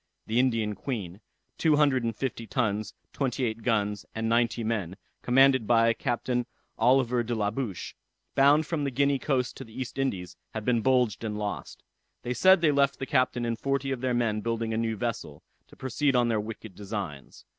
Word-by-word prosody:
the 115 +2 +1
Indian 115 -5 +1
Queen, 100 -4 -5 0.4
two 160 -2 +4
hundred 140 -4 +3
and 115 -1 -2
fifty 115 -2 -4
tons, 110 -4 -1 0.2
twenty 130 -2 -1
eight 110 0 -3
guns, 105 -4 0
and 110 0 -1
ninety 115 0 +1
men, 100 -5 -2 0.2
commanded 130 -2 +4
by 115 -1 +4
Captain 120 +1 -1 0.3
Oliver 125 -1 +3
de 120 0 -2
la 105 -2 0
Bouche, 110 -6 -4 0.4
bound 145 +3 +5
from 155 -2 -2
the 140 - 0
Guinea 140 +1 +1
coast 130 -3 -1
to - - -7
the 110 +2 -11
East 130 +1 -5
Indies, 90 -10 -2 0.2
had 110 -1 -4
been 120 -2 +2
bulged 125 -3 +2
and 105 -2 -3
lost. 105 -1 -5 0.4
They 125 - -2
said 190 +6 +5
they 155 -3 +4
left 140 -1 +2
the 135 - -4
captain 130 -2 +1
and 115 0 -2
forty 135 0 -1
of 130 -2 -3
their 130 -2 0
men 115 -3 0
building 115 0 -2
a - - -1
new 115 -1 -1
vessel, 100 -10 -4 0.2
to - - -17
proceed 135 +2 0
on 120 -1 +3
their 110 -2 +1
wicked 110 -1 -8
designs. 95 -9 -7
120 Hz, 190 wpm, -28 LUFS, 110-130 Hz, 0.4 s, bound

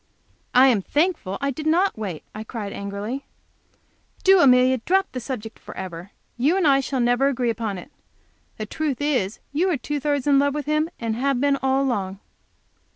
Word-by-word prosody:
"I 255 +1 +8
am 225 -6 +2
thankful 295 - 0
I 280 0 0
did 305 +4 -5
not 360 +5 +3
wait," 195 -8 -5
I 215 - -6
cried, 220 -3 -6
angrily. 200 +7 -5 1.0
"Do, 385 -1 +6
Amelia, 255 -2 +5
drop 385 +10 +1
the 255 - -4
subject 235 -3 -6
forever. 180 -1 -8 0.3
You 300 +9 +3
and 380 - +1
I 275 -2 +5
shall 270 0 -2
never 245 +3 +3
agree 250 -3 0
upon 220 -3 -3
it. 220 +11 -11 0.7
The 215 - -4
truth 290 +3 -2
is, 255 -9 0 0.2
you 350 +6 +2
are 335 - +1
two 295 +4 -3
thirds 285 -2 -1
in 280 -2 +5
love 285 0 +1
with 295 -2 -3
him, 305 +1 +1
and 230 -2 -2
have 270 +1 0
been, 280 +1 +3
all 265 +1 +2
along." 195 -7 -2
260 Hz, 185 wpm, -23 LUFS, 220-290 Hz, 1.0 s, I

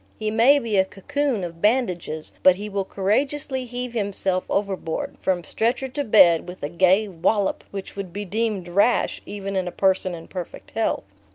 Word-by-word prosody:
He 215 -1 -2
may 235 +6 +5
be 230 -7 -1
a 190 - +5
cocoon 260 +3 -2
of 170 -1 -7
bandages, 180 -9 0
but 185 -1 +6
he 205 +2 -6
will 200 -1 -1
courageously 260 +7 -1
heave 245 0 -5
himself 195 -4 -1
overboard, 195 -5 -2
from 180 -2 0
stretcher 235 - -1
to 285 +3 -2
bed, 180 - +5
with 180 -2 -10
a 145 - -2
gay 185 +5 +3
wallop 195 +3 0
which 195 -1 -7
would 195 -3 -5
be 205 +3 -5
deemed 210 -2 -2
rash 200 +7 +2
even 195 -1 -5
in 185 -1 0
a - - -3
person 190 -1 +1
in 165 - -10
perfect 180 -3 -8
health. - - 0
200 Hz, 180 wpm, -23 LUFS, 185-230 Hz, -, but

